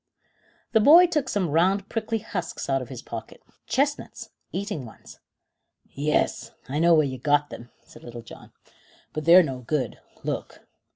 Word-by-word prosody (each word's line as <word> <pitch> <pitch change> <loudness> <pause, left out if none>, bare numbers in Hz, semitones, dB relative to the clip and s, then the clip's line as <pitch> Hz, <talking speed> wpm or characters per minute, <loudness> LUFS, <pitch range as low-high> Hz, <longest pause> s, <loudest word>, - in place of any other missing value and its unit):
The 220 - +4
boy 320 +10 +8
took 300 -6 -1
some 185 -7 -1
round 190 +5 +2
prickly 225 0 -2
husks 200 -6 -5
out 135 -1 +1
of 125 - -8
his 130 -3 -8
pocket. 115 -1 -8 0.3
"Chestnuts 285 +2 -2 0.2
eating 200 -7 -4
ones." 115 - -14 0.7
"Yes, 150 +2 0 0.2
I 140 +4 -2
know 170 +1 +5
where 155 -2 +4
you 130 -2 -5
got 145 +2 +1
them," 120 - -10 0.2
said - - -16
Little 120 -1 -9
John, 115 - -13 0.6
"but 155 - -4
they're 175 +2 +8
no 135 -5 -4
good. 125 -1 -3 0.2
Look." - - -5
155 Hz, 160 wpm, -25 LUFS, 130-205 Hz, 0.7 s, boy